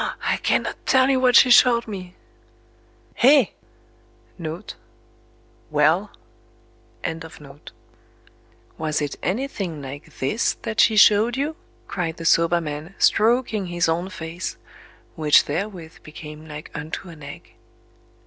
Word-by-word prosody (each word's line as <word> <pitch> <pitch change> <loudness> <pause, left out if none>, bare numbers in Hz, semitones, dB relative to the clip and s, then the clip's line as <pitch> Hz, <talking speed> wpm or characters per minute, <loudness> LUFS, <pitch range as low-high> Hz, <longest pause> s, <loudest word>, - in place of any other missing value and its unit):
_ - - -2
I - - +1
cannot - - -1
tell 260 +1 +4
you 260 - +2
what 250 -1 +3
she 255 - +7
showed 240 -1 +5
me!"... 185 -4 -8 1.1
"Hé! 270 -3 +6 0.9
(4) 160 0 -4 2.7
Was 155 -1 -1
it 145 -2 -3
anything 190 - -3
like 145 +3 -10
THIS 140 - 0
that 225 -1 -4
she 220 - +5
showed 215 +4 +5
you?" 295 +3 -2 0.3
cried 170 -3 -3
the 165 - -8
soba 165 +1 +3
man, 155 +3 -6
stroking 220 -3 +2
his 175 0 0
own 170 +3 -1
face—which 160 -2 -2
therewith 170 0 -5
became 150 0 -11
like 150 0 -9
unto 160 +4 -6
an 160 -2 -13
Egg... 145 0 -11
175 Hz, 110 wpm, -22 LUFS, 155-220 Hz, 2.7 s, she